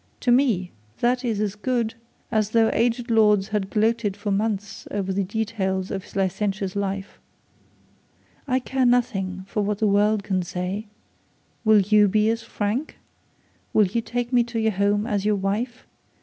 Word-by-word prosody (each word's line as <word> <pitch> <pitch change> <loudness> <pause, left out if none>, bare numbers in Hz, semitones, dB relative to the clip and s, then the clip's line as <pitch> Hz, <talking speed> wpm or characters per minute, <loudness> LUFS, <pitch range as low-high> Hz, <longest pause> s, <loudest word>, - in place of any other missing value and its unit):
To 245 - +2
me 235 -9 +2 0.3
that 245 +2 +1
is 225 -4 -1
as 210 -2 0
good 230 +1 -1 0.4
as 215 -2 +1
though 225 0 +3
aged 235 +1 0
lords 210 -3 +4
had 210 -3 -1
gloated 215 -1 +1
for 205 0 -3
months 205 0 -2
over 195 -2 -2
the 200 +1 0
details 190 -2 -2
of 195 -2 -4
his - - -17
licentious 195 0 -1
life. 195 -1 -3 1.3
I 255 -1 +2
care 260 0 0
nothing 195 -7 0
for 210 - -1
what 205 0 -1
the 215 - +1
world 205 +1 +3
can 190 -2 0
say. 180 +4 -4 0.8
Will 215 -2 +6
you 210 +1 +4
be 215 +2 +3
as 230 0 -2
frank? 225 +5 -3 0.8
Will 215 - +5
you 215 +5 -1
take 245 +2 -3
me 240 -1 +5
to 235 -1 -5
your 220 0 +2
home 205 +1 +1
as 205 -4 -1
your 210 0 +2
wife? 205 +5 -2
210 Hz, 165 wpm, -24 LUFS, 195-230 Hz, 1.3 s, Will